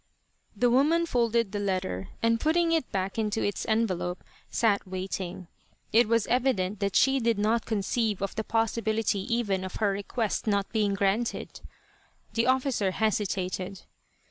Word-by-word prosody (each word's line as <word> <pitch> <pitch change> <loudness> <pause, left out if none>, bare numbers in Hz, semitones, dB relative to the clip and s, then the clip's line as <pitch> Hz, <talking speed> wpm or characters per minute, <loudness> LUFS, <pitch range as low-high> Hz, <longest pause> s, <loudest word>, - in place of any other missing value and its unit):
The 245 +3 +3
woman 305 +7 +3
folded 235 -6 +1
the 205 - -2
letter, 185 - -2
and 230 0 +3
putting 330 +4 +2
it 325 -5 0
back 195 +2 -2
into 215 0 0
its 205 - -2
envelope 190 -5 0 0.3
sat 205 -4 +1
waiting. 185 -1 -5 0.5
It 235 +1 +5
was 230 -1 +2
evident 230 -6 +1
that 200 -2 -1
she 270 +1 +4
did 230 -3 +1
not 220 +3 +1
conceive 220 0 0
of 195 - -2
the 220 - -3
possibility 225 -1 0
even 205 -5 0
of 185 - -6
her 210 -2 +1
request 205 +3 -2
not 200 -2 +1
being 210 -3 +1
granted. 200 +4 -1 0.7
The 230 +1 +1
officer 255 -6 +2
hesitated. 195 -3 -1
215 Hz, 145 wpm, -28 LUFS, 195-235 Hz, 0.7 s, It